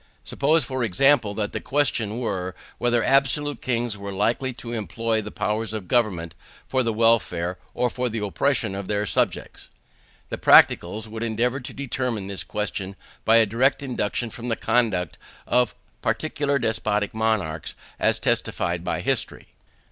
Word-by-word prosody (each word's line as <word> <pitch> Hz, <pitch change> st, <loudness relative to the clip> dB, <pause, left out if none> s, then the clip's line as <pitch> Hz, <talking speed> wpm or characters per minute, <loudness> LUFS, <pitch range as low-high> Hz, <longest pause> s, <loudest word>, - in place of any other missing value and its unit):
Suppose, 155 Hz, +2 st, +2 dB
for 130 Hz, 0 st, -2 dB
example, 115 Hz, 0 st, +3 dB
that 105 Hz, -1 st, -2 dB
the -, -, -4 dB
question 120 Hz, -7 st, 0 dB
were, 95 Hz, -7 st, -3 dB, 0.2 s
whether 120 Hz, -1 st, +2 dB
absolute 140 Hz, +2 st, +2 dB
kings 120 Hz, -3 st, -1 dB
were 100 Hz, 0 st, -6 dB
likely 115 Hz, +7 st, 0 dB
to 120 Hz, -1 st, -7 dB
employ 110 Hz, +2 st, -1 dB
the 105 Hz, -, -7 dB
powers 110 Hz, +1 st, -2 dB
of 105 Hz, -5 st, -5 dB
government 90 Hz, -8 st, +1 dB, 0.3 s
for 130 Hz, -, +1 dB
the 115 Hz, -2 st, 0 dB
welfare 105 Hz, -6 st, +2 dB, 0.2 s
or 125 Hz, -, +2 dB
for 125 Hz, +1 st, -2 dB
the 115 Hz, -, -4 dB
oppression 105 Hz, +2 st, 0 dB
of 100 Hz, -1 st, -5 dB
their 105 Hz, 0 st, 0 dB
subjects. -, -, -1 dB, 0.6 s
The -, -, -4 dB
practicals 105 Hz, +6 st, +5 dB
would 110 Hz, 0 st, -7 dB
endeavour 120 Hz, +3 st, 0 dB
to 125 Hz, -, -8 dB
determine 125 Hz, -6 st, -3 dB
this 100 Hz, -1 st, -4 dB
question 100 Hz, -2 st, -4 dB, 0.3 s
by 110 Hz, -, +5 dB
a 115 Hz, -1 st, +6 dB
direct 130 Hz, +7 st, +1 dB
induction 120 Hz, -2 st, -2 dB
from 120 Hz, 0 st, -7 dB
the 115 Hz, -, +1 dB
conduct 100 Hz, -, 0 dB, 0.3 s
of 125 Hz, -3 st, +2 dB, 0.3 s
particular 145 Hz, -2 st, 0 dB
despotic 110 Hz, -3 st, 0 dB
monarchs, 110 Hz, -9 st, -1 dB, 0.2 s
as -, -, +2 dB
testified 85 Hz, 0 st, -1 dB
by -, -, -2 dB
history. -, -, -2 dB
115 Hz, 155 wpm, -24 LUFS, 100-125 Hz, 0.6 s, a